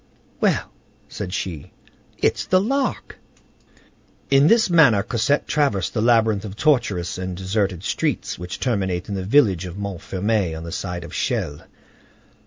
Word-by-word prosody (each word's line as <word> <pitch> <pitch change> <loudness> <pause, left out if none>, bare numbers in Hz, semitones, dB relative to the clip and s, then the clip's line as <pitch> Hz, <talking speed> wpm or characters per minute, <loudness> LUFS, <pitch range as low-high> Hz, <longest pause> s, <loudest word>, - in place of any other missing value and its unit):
"Well," - - +1 0.4
said 90 - -6
she, 85 -6 -5 0.4
"it's - - 0
the 185 - +4
Lark!" 270 +8 -2 1.1
In 140 +2 +6
this 225 +4 +5
manner 145 - +5
Cosette 125 +5 0
traversed 140 - 0
the 110 - 0
labyrinth 110 -3 +3
of 100 -2 -7
tortuous 110 - +1
and 95 -1 -4
deserted 95 -1 -1
streets - - -2
which 90 0 -6
terminate 95 -8 -1
in - - -3
the 95 -1 -3
village 100 - +3
of 90 +2 -8
Montfermeil 100 -1 -2
on 80 - -7
the 85 - -7
side 90 -1 -4
of - - -10
Chelles. 75 0 -2
100 Hz, 145 wpm, -22 LUFS, 90-125 Hz, 1.1 s, In